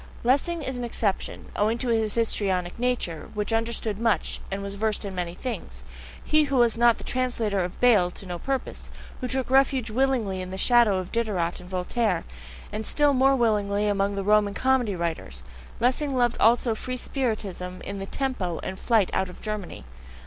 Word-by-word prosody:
Lessing 285 +7 +1
is 260 -2 -4
an - - -3
exception, 220 -4 -2
owing 215 +3 +1
to 245 +1 -3
his 220 -2 +1
histrionic 195 -5 0
nature, 245 -10 -1
which 210 +2 -1
understood 225 -2 -1
much, 230 -1 +1
and 195 +1 -4
was 200 0 -5
versed 215 +1 -1
in 195 - -5
many 175 -1 -3
things; 180 - -6 0.4
he 305 0 +3
who 275 -1 -2
was 240 -3 +4
not 235 0 +4
the - - -11
translator 240 -5 -1
of 180 0 -3
Bayle 215 -8 +5
to 185 - -11
no 175 -2 -5
purpose, 270 +4 -3 0.3
who 250 - -3
took 260 0 -1
refuge 265 -3 +3
willingly 235 -6 +1
in 185 - -6
the 190 - -5
shadow 235 -2 +4
of 185 -1 -5
Diderot 200 -7 -1
and 180 - -12
Voltaire, 195 +5 0 0.5
and 215 +1 -3
still 290 +5 +3
more 270 +1 +4
willingly 210 -4 +1
among 200 0 +1
the 195 - -2
Roman 205 0 +3
comedy 255 -6 +2
writers 160 - -4 0.4
Lessing 260 +3 +1
loved 240 -1 +2
also 230 +1 +4
free 255 +3 -5
spiritism 205 -9 -3
in 200 0 -5
the 195 - -5
TEMPO, 200 -12 -2
and 190 0 -5
flight 220 -6 +2
out 190 - 0
of 180 - -12
Germany. 210 - -5
220 Hz, 185 wpm, -26 LUFS, 190-245 Hz, 0.5 s, Bayle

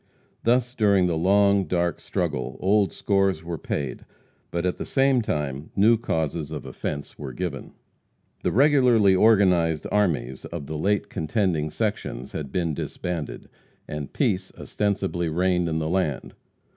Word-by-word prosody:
Thus, 120 +1 +2
during 100 -6 +3
the 85 -2 +1
long, 100 +3 +3
dark 85 -2 0
struggle, 65 - -3
old 100 +1 +2
scores 95 -4 +1
were 85 -1 -5
paid, 70 -4 -4 0.5
but 85 +1 -2
at 90 - 0
the - - -4
same 135 -2 +3
time 75 - -3
new 110 +4 +5
causes 80 -8 -2
of - - -6
offense 70 0 -6
were 65 -3 -6
given. 80 -3 -5 0.7
The - - 0
regularly 125 -7 +5
organized 90 -6 +4
armies 70 -12 0
of 85 -4 -6
the 80 - -5
late 100 +6 0
contending 80 -2 0
sections 105 - -3
had 70 -4 -5
been 85 -3 -1
disbanded, 85 +1 -5 0.4
and 75 -2 -5
peace 95 0 0
ostensibly 95 -4 -1
reigned 90 +1 +1
in 80 - -1
the 80 -1 -1
land. 80 -5 -1
90 Hz, 145 wpm, -25 LUFS, 80-100 Hz, 0.7 s, new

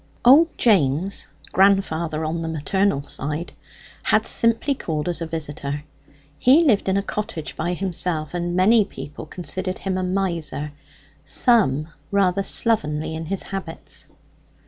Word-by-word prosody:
Old 305 +7 +6
James 185 - +2 0.3
(grandfather 170 -5 +2
on 165 +2 -2
the 165 - -3
maternal 160 0 0
side) 150 +4 -4 0.5
had - - +2
simply 230 +5 +2
called 160 - -3
as 175 -1 -1
a 165 - -2
visitor. 150 -2 -4 0.6
He 280 +7 +6
lived 220 -10 +3
in 190 - +2
a 200 - 0
cottage 195 -7 -5
by 175 +2 -2
himself, 175 -4 -2
and 175 0 -2
many 210 +5 +5
people 145 -5 -9
considered 185 +3 -3
him 185 -1 -2
a - - -1
miser; 170 -5 -2 0.5
some, 165 - +2 0.2
rather 200 -1 +2
slovenly 160 -9 0
in 160 0 -5
his 195 +2 -2
habits. 190 -4 -7
180 Hz, 135 wpm, -22 LUFS, 155-200 Hz, 0.6 s, Old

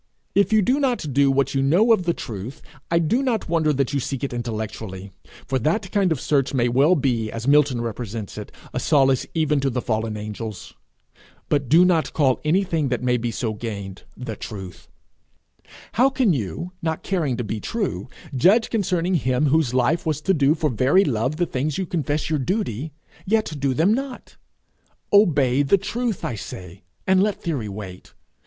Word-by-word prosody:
If 200 +1 +3
you 215 -1 +4
do 260 +8 +2
not 245 - -1
do 140 +1 +4
what 135 0 +1
you 135 - +1
know 180 - +4
of 185 -5 0
the 170 - +2
truth, 110 +4 -7 0.3
I 170 - +2
do 170 - +2
not 245 -6 -1
wonder 160 -2 +2
that 140 -1 0
you 140 - +1
seek 135 +1 -4
it 135 - -2
intellectually, 110 -4 -5 0.3
for 130 0 -1
that 180 - -1
kind 195 -4 +2
of 155 - 0
search 140 -1 0
may 120 -2 +2
well 140 +9 +4
be, 120 -7 0
as 115 +2 -5
Milton 140 -4 +4
represents 115 -2 -5
it, - - -8 0.2
a - - -1
solace 135 -3 +3
even 150 -2 +2
to 135 0 0
the 125 0 -2
fallen 110 -2 -2
angels. 105 -2 -7 0.8
But 140 -4 0
do 170 +5 +6
not 170 -3 +1
call 135 -5 +2
anything 165 -2 +1
that 125 -1 -2
may 125 -1 +2
be 120 0 -1
so 115 -1 -2
gained, 100 -4 -6 0.2
The 115 -4 -5
Truth. 95 -4 -9 1.0
How 255 +5 +4
can 255 -8 +2
you, 130 - -4
not 160 -2 -2
caring 155 -10 -1
to 125 - -2
be 110 0 -4
true, 215 - -3 0.3
judge 195 - +4
concerning 185 -4 0
him 130 -2 +1
whose 155 -3 +2
life 130 +6 +1
was 155 -2 -1
to 190 - +2
do 145 -2 +3
for 155 -3 0
very 130 - +3
love 130 +3 0
the 175 +2 +1
things 145 0 -2
you 190 - -1
confess 155 -3 -2
your 155 -2 0
duty, 155 - -2 0.4
yet 215 -4 +1
do 135 -1 0
them 175 - +3
not? 265 +1 -5 0.8
Obey 145 -10 +4
the 145 +8 +4
truth, 225 +2 -3
I - - -2
say, 90 -3 -9 0.2
and 190 0 +4
let 205 -1 0
theory 140 - -2
wait. 95 -2 -9
140 Hz, 190 wpm, -23 LUFS, 120-175 Hz, 1.0 s, do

